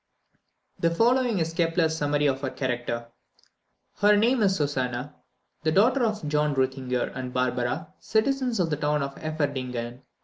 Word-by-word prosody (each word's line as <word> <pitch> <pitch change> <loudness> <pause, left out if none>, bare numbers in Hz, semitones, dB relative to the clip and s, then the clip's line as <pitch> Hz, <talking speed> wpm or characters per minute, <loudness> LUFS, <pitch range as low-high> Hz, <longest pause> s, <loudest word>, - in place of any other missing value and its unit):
The 170 - +3
following 240 +5 +2
is 165 -1 -1
Kepler's 165 -1 +1
summary 145 -1 +1
of 135 -1 +1
her 135 - -1
character: 120 -3 -3 0.9
"Her 205 0 +5
name 235 +3 +3
is 195 -2 +3
Susannah, 135 -2 -2 0.5
the 155 - +1
daughter 245 - +4
of 215 -8 -1
John 150 0 +1
Reuthinger 130 -1 -1
and 130 -1 -4
Barbara, 125 +3 -1
citizens 250 +1 0
of 165 -3 +1
the 150 - 0
town 150 0 0
of 140 0 -4
Eferdingen. 130 -6 -3
150 Hz, 145 wpm, -26 LUFS, 130-190 Hz, 0.9 s, Her